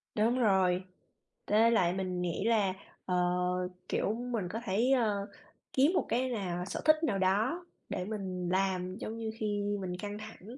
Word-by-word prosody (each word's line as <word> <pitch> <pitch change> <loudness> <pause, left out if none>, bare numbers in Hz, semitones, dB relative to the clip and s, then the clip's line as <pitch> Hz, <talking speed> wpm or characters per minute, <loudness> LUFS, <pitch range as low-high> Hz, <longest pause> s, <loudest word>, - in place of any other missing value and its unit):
Đúng 230 +4 +2
rồi, 190 -4 +3 0.6
tới 225 +2 +4
lại 180 -6 +3
mình 185 -1 -2
nghĩ 175 +2 -1
là, 210 -5 +3 0.3
ờ, 180 - 0 0.7
kiểu, 210 - +1
mình 235 -5 -3
có 225 - -3
thể, 220 +7 +2
ờ, 210 -6 +2 0.5
kiếm 285 +7 +4
một - - +2
cái 255 +2 +1
nào 180 -6 -2
sở - - -4
thích 310 +1 +5
nào 200 -11 +1
đó 220 - +1 0.2
để 180 - -2
mình 185 -4 -3
làm. 185 -1 0
Giống 225 0 -5
như 220 -1 -3
khi 205 -1 -1 0.2
mình 180 -1 -3
căng 205 +2 -5
thẳng 215 +3 -10
205 Hz, 170 wpm, -31 LUFS, 185-230 Hz, 0.7 s, thích